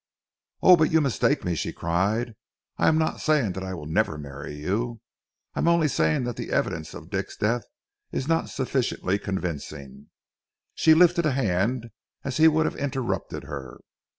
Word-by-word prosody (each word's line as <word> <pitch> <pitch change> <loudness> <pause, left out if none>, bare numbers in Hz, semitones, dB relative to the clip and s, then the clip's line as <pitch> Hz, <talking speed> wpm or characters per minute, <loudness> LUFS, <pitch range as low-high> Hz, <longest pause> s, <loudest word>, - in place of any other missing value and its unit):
"Oh, 185 - +9
but 155 -1 +2
you 160 - +5
mistake 140 -6 +1
me," 90 - 0
she 80 - -2
cried. 100 +8 -1 0.5
"I - - +3
am 155 - +4
not 160 0 0
saying 150 -10 +2
that 95 +1 -5
I 95 0 -4
will 75 - -8
never 80 0 0
marry 70 0 -8
you. 110 +10 -2 0.5
I - - -4
am - - +1
only 170 -2 +4
saying 80 - +1
that 120 -1 -4
the - - -5
evidence 80 -1 -1
of - - -11
Dick's - - -3
death 115 +3 0 0.5
is 135 - -3
not 165 0 +1
sufficiently 125 -7 -1
convincing." 75 -8 -5 0.6
She 160 -1 +5
lifted 170 -1 +5
a 145 - +1
hand 115 +1 0 0.3
as 135 -1 -3
he 160 +1 +7
would 160 0 +3
have - - -2
interrupted 135 -3 -3
her. 65 -3 -8
115 Hz, 175 wpm, -25 LUFS, -, 0.6 s, Oh